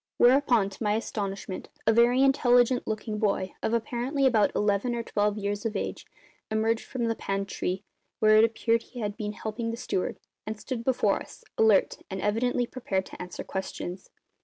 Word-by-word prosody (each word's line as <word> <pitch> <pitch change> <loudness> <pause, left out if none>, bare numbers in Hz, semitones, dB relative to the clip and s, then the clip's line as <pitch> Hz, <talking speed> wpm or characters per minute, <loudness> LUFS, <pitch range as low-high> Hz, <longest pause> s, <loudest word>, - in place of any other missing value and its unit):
Whereupon, 245 -5 +4
to 195 - -13
my 210 -1 +2
astonishment, 200 -4 -4 0.2
a 225 - +5
very 240 +3 +5
intelligent 245 -2 +4
looking 215 0 -3
boy, 195 -3 0
of - - 0
apparently 245 +4 0
about 225 -5 +4
eleven 210 +4 +1
or 235 - -2
twelve 210 -1 0
years 205 0 -2
of 225 -2 -2
age, - - -4 0.4
emerged 220 +1 0
from 245 -3 -3
the 230 - +1
pantry, 195 -2 -3 0.3
where 215 0 +5
it 215 - +7
appeared 230 0 +2
he 245 0 -9
had 205 -1 -2
been 210 -2 -4
helping 220 +2 -4
the 230 - -3
steward, 235 -6 -2 0.3
and 215 0 -5
stood 240 0 -4
before 235 -5 +2
us, - - -12
alert 220 -3 +4
and 190 - -4
evidently 240 +5 +1
prepared 195 -7 -2
to - - -10
answer 180 0 -6
questions. 190 -1 -5
220 Hz, 175 wpm, -27 LUFS, 205-240 Hz, 0.4 s, it